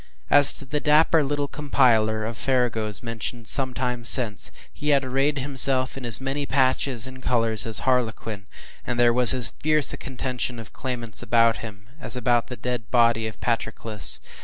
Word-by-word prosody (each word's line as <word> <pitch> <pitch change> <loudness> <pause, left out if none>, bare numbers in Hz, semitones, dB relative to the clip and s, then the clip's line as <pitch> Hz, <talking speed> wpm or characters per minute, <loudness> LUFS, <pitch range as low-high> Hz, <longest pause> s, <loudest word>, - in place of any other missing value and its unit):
As 145 -1 +7
to 140 - -8
the 150 +3 -3
dapper 155 +1 +3
little 145 0 -2
compiler 115 -7 +1
of 115 +1 -5
farragos 115 -6 -1
mentioned 115 0 -5
some 130 +1 +2
time 125 -1 -3
since, 115 -3 +2 0.2
he 150 - -4
had 140 -2 +3
arrayed 135 +3 -1
himself 130 -1 +1
in 135 -2 -7
as 115 -1 +3
many 135 +2 -4
patches 130 -2 +1
and 130 0 -9
colors 115 -3 0
as 110 -1 +1
harlequin, 115 -5 -2 0.4
and 120 -1 -4
there 120 -1 +4
was 125 +1 +6
as 125 -3 +4
fierce 155 -2 +2
a - - -6
contention 125 -2 -4
of 115 -2 -11
claimants 120 -4 -4
about 115 -1 +2
him, 105 -2 -11
as - - 0
about 120 -1 0
the 125 - -8
dead 125 -2 -5
body 115 -2 +2
of 110 - -9
Patroclus. 110 -3 -1
125 Hz, 175 wpm, -23 LUFS, 115-135 Hz, 0.4 s, As